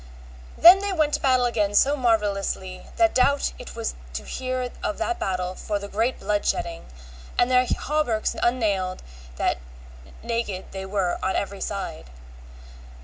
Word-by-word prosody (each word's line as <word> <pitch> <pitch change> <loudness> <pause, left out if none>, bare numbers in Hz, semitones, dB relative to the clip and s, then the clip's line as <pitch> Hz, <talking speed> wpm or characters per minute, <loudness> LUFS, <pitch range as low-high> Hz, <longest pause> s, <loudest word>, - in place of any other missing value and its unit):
Then 355 +3 +9
they 405 0 -1
went 310 -5 +1
to - - +1
battle 255 -2 +3
again 210 -4 0
so 280 +7 +5
marvellously 205 -6 -1
that 340 -1 +3
doubt 280 +2 +2
it - - -9
was - - -3 0.2
to 70 +3 -4
hear 255 - -3
of 315 - -2
that 360 - -2
battle 185 -1 -2
for 205 +2 -3
the 200 0 -6
great 225 +5 -1
blood 205 -1 0
shedding, 170 -1 -2 0.5
and 245 +1 +3
their 250 0 +4
hauberks 260 -8 0
unnailed 205 -7 0 0.3
that - - 0 0.6
naked 230 -5 -3
they 190 0 -6
were 190 -3 -1
on 190 - 0
every 200 0 -3
side. 185 - -5
215 Hz, 150 wpm, -24 LUFS, 190-255 Hz, 0.6 s, Then